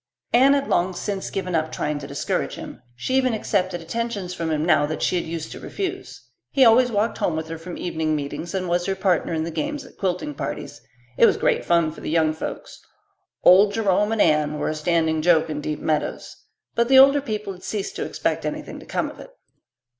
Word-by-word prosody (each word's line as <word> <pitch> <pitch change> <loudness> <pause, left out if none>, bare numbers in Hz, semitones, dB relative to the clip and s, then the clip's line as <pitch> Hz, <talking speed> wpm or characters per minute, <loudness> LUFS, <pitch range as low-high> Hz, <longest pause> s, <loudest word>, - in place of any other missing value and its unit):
Anne 265 +4 +6
had 280 0 -1
long 180 +1 +1
since 195 +1 -3
given 185 -2 -3
up 160 -1 0
trying 150 0 -2
to 140 - -8
discourage 140 +1 -2
him; - - -9
she 125 - -3
even 255 -3 +2
accepted 185 -4 -1
attentions 205 -1 -3
from 165 -2 -3
him 155 0 0
now 155 -4 +4
that 155 - -3
she - - +1
had 175 - -1
used 165 -1 -5
to - - -8
refuse. 380 -1 -6 0.2
He 270 -2 +4
always 245 +2 +5
walked 215 +1 0
home 165 - 0
with 160 0 -3
her 165 - -5
from 170 +1 -8
evening 160 -3 -1
meetings 150 +5 -5
and 185 -1 -2
was 175 +1 0
her 195 - 0
partner 190 -3 +1
in 160 -1 -1
the 165 - -4
games 295 - -3
at - - -17
quilting 180 -6 -2
parties. - - -6 0.4
It - - +8
was - - +2
great - - +1
fun 170 -2 +2
for 160 - -12
the - - -4
young 160 -1 +2
folks. 160 - -7 0.6
"Old 200 +3 +7
Jerome 210 -1 +2
and 225 -2 +3
Anne" 150 -1 +2
were - - -1
a - - -1
standing 160 0 +1
joke 160 -1 +3
in 150 -1 -3
Deep 150 0 -3
Meadows. 155 -1 -2 0.4
But 235 0 +2
the 265 +1 +6
older 275 +2 +7
people 210 -6 -4
had 180 - -14
ceased 205 -2 -4
to - - -2
expect - - -2
anything - - -5
to - - -14
come - - -1
of - - -11
it. - - -11
175 Hz, 220 wpm, -23 LUFS, 160-215 Hz, 0.6 s, It